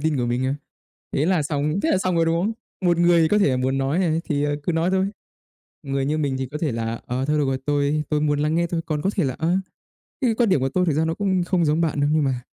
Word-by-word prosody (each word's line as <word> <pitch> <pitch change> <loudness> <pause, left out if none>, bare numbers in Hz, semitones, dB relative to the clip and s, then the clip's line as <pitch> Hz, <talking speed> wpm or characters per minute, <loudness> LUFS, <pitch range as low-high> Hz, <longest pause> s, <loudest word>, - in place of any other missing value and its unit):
tin 155 -1 0
của 125 - 0
mình 120 +2 -1
cơ. 135 +2 0 0.6
Thế 145 - +1
là 180 -4 +2
xong 150 +4 -1
thế 325 - +1
là - - +3
xong 185 -2 0
rồi, 165 - +3
đúng 165 +1 +1
không? 220 +3 0 0.3
Một 175 -1 +3
người 175 0 +5
thì 160 - +3
có 210 - +3
thể 195 - +4
là 130 - +1
muốn 130 +1 0
nói 135 +6 0
này 165 -3 +1
thì, 145 -1 -1
ờ, 145 0 0
cứ 175 - -1
nói 165 +3 +1
thôi. 190 0 +2 0.8
Người 135 0 -1
như 155 +2 0
mình 140 -3 0
thì 130 - -2
có 145 +4 -6
thể 150 -5 -1
là 115 0 -3
"Ờ, 130 +2 -2
thôi 150 +1 +1
được 145 - +2
rồi, 135 0 -1
tôi 145 +1 +1
tôi 150 -1 +1
muốn 145 -1 +1
lắng 150 +2 +1
nghe 170 +1 +2
thôi. 165 -1 -2
Còn 150 -2 -2
có 195 - +1
thể 185 - +1
là, 130 -2 -1
ờ, 170 +3 +1 0.7
cái 240 -3 +2
quan 235 -3 +2
điểm 165 - +3
của 135 - 0
tôi 180 +6 +1
thực 160 - +1
ra 160 +2 +1
nó 160 - 0
cũng 190 -2 0
không 175 -2 +1
giống 155 +3 +2
bạn 155 -3 0
đâu.", 145 - +2
nhưng 155 -1 +2
mà 130 -2 -1
155 Hz, 305 wpm, -23 LUFS, 140-175 Hz, 0.8 s, người